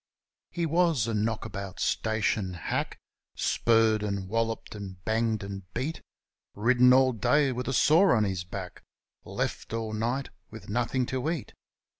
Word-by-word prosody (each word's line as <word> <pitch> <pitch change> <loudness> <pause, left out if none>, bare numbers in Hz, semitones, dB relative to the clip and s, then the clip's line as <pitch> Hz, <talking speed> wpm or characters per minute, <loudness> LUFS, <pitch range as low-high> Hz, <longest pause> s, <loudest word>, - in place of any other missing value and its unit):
He 170 -1 -2
was 165 -6 +2
a 115 - -2
knock 110 +1 -1
about 100 -2 -6
station 105 -4 0
hack, 85 - -3 0.4
Spurred 115 -2 +2
and 100 -2 -3
walloped, 115 +2 -2
and 100 -3 -7
banged 110 -1 0
and 100 -2 -8
beat; 155 +5 -3 0.5
Ridden 125 +4 +5
all 130 0 +5
day 130 +5 +2
with 125 0 -4
a 135 - -1
sore 160 +3 +5
on 110 - +3
his 95 -4 -2
back. 90 0 -7 0.4
Left - - -3
all 110 -1 -3
night 120 +5 -2 0.2
with 110 -1 -11
nothing 125 +3 0
to 130 +4 -2
eat. 165 -6 -4
115 Hz, 150 wpm, -28 LUFS, 105-130 Hz, 0.5 s, Ridden